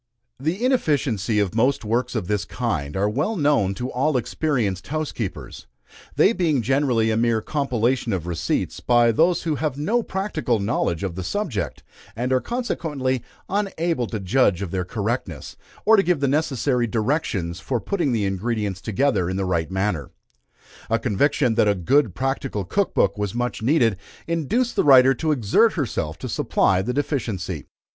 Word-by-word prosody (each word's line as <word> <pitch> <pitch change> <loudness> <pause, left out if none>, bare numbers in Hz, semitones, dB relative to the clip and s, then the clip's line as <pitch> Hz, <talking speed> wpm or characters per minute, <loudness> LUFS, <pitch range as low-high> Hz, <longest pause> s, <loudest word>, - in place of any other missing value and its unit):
The 170 - -1
inefficiency 135 - +1
of 100 -2 +1
most 125 +2 +1
works 120 +3 -1
of 110 -5 -1
this 105 -2 0
kind 70 +4 -3
are 100 +2 +2
well 140 - -1
known 145 - +2
to 125 +4 -4
all 135 +2 +1
experienced 120 - -1
housekeepers, 145 -10 -5 0.5
they 210 - +4
being 160 - +1
generally 125 -4 +2
a - - +1
mere 115 -1 +2
compilation 125 -2 0
of 90 -4 -2
receipts, 85 -2 -2
by 120 -1 +4
those 165 +9 +2
who 155 -3 -1
have 150 -2 -2
no 215 +12 +1
practical 185 - -1
knowledge 100 -5 -1
of 95 -3 -2
the 95 +2 -5
subject, 155 - -3 0.3
and 125 +3 -1
are 130 - +2
consequently 150 - -2 0.3
unable 170 - -1
to 110 - -4
judge 100 -1 +2
of 90 - -5
their 95 -1 -1
correctness, 105 - -4 0.3
or 220 +1 +6
to - - +6
give 180 -5 +1
the 140 - +1
necessary 135 -4 +1
directions 110 - -1
for 125 +4 -2
putting 175 - -1
the 110 -4 0
ingredients 100 0 -2
together 110 -4 +1
in 95 - -2
the 95 - -1
right 85 -3 -1
manner. 95 -6 -1 0.8
A 115 - +3
conviction 120 +3 +1
that 110 - +3
a 100 - +3
good 105 - +2
practical 135 -5 -2
Cook 195 - -1
Book 100 +1 +2
was 105 +1 -2
much 120 -2 -2
needed, 115 - +3 0.3
induced 170 - 0
the - - +2
writer 135 -2 +7
to 155 +4 -1
exert 145 - +3
herself 85 - -2
to - - -6
supply 95 -1 +1
the 115 +6 -2
deficiency. 110 - -3
120 Hz, 165 wpm, -23 LUFS, 100-150 Hz, 0.8 s, writer